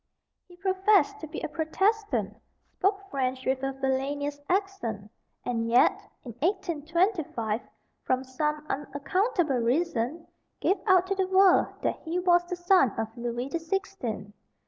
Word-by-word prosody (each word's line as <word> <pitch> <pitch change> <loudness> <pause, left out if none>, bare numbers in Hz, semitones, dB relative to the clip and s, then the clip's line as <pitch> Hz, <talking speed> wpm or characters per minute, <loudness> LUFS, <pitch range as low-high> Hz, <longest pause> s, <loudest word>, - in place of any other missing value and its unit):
He 355 -1 -16
professed 385 +1 +2
to 315 - -7
be 310 - -6
a - - -2
Protestant, 320 - 0 0.4
spoke 395 +1 0
French 260 -1 -1
with 260 0 0
a 270 0 -1
villainous 275 +2 -2
accent, 355 - -2 0.3
and 230 -2 -1
yet, 240 +2 +6 0.3
in 240 - -6
1825, 330 - 0 0.4
from 255 0 0
some 300 +3 -2
unaccountable 295 - 0
reason, 270 +3 0 0.3
gave 390 - +2
out 370 -2 +5
to 390 - -1
the 380 -1 0
world 380 0 +5 0.2
that - - 0
he 330 +2 -3
was 350 -1 +4
the 360 - -4
son 350 - +4
of 225 0 -3
Louis 240 +2 -3
the 335 - -2
Sixteenth. 325 - -4
310 Hz, 140 wpm, -28 LUFS, 255-375 Hz, 0.4 s, yet